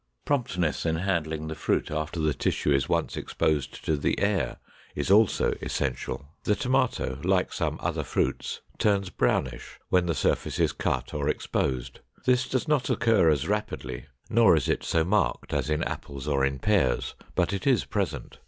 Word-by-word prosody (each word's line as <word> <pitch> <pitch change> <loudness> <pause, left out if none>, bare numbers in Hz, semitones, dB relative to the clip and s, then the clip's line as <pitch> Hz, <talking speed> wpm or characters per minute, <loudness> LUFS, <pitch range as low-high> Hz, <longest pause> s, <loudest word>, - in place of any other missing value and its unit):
Promptness 90 - 0
in 80 -1 +1
handling 80 -3 -1
the 80 - -3
fruit - - -1
after 75 +2 -3
the 75 -1 +2
tissue 75 - 0
is 70 -2 +1
once - - 0
exposed 75 -3 -1
to 80 - +2
the 70 - 0
air 100 -5 0 0.4
is - - -1
also 105 0 +4
essential. 70 - -3 0.2
The 105 - +2
tomato, 125 - 0
like - - +2
some - - -1
other - - -2
fruits, - - -1 0.2
turns 100 -3 +2
brownish 60 -2 -1
when 90 -1 +3
the 85 - 0
surface - - 0
is - - +2
cut - - -2
or - - -1
exposed. 65 -3 -2 0.3
This 125 0 +2
does 130 +4 -1
not 150 -4 +1
occur 110 -8 +4
as 75 0 +1
rapidly, 65 -13 -3 0.2
nor 110 -6 +5
is 75 - 0
it - - 0
so 80 - +2
marked 90 -8 0
as - - 0
in 75 +1 +1
apples 70 0 -5
or 70 -2 +1
in 70 0 +1
pears, 85 -5 +1 0.2
but 90 +3 +1
it 100 +4 -3
is 130 -4 +3
present. 90 - -3
85 Hz, 170 wpm, -27 LUFS, 70-105 Hz, 0.4 s, nor